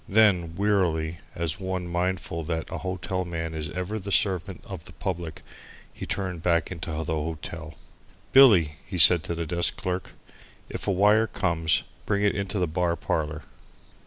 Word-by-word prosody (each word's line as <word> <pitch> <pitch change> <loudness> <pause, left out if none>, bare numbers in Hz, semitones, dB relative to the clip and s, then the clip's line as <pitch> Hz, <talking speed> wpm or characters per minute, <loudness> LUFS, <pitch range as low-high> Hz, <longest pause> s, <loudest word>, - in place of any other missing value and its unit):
Then 95 -6 +4
wearily, 85 -5 +1 0.2
and 85 - -3
as 80 +1 -1
one 95 -1 -3
mindful 85 -1 -2
that 80 0 -3
a - - -3
hotel 95 0 -2
man 80 -2 -4
is 80 0 -3
ever 90 +6 -3
the 100 0 -6
servant 95 -4 +1
of - - -8
the - - -12
public, 85 -4 -4 0.5
he - - -7
turned 95 -4 -3
back 85 -1 +1
into 85 -1 -5
the 80 - -2
hotel. 80 0 -5 0.6
"Billy," 95 - +7
he 95 - -6
said 85 0 +8
to 85 - -2
the 85 0 -3
desk 85 +1 0
clerk, 90 0 -3 0.6
"if - - -5
a - - +3
wire 105 +4 +4
comes 85 -5 +1 0.2
bring 100 0 +1
it 105 - +3
into 100 +1 -2
the 90 - +2
bar 85 +1 0
parlour." 75 -3 -2
85 Hz, 170 wpm, -26 LUFS, 80-95 Hz, 0.6 s, said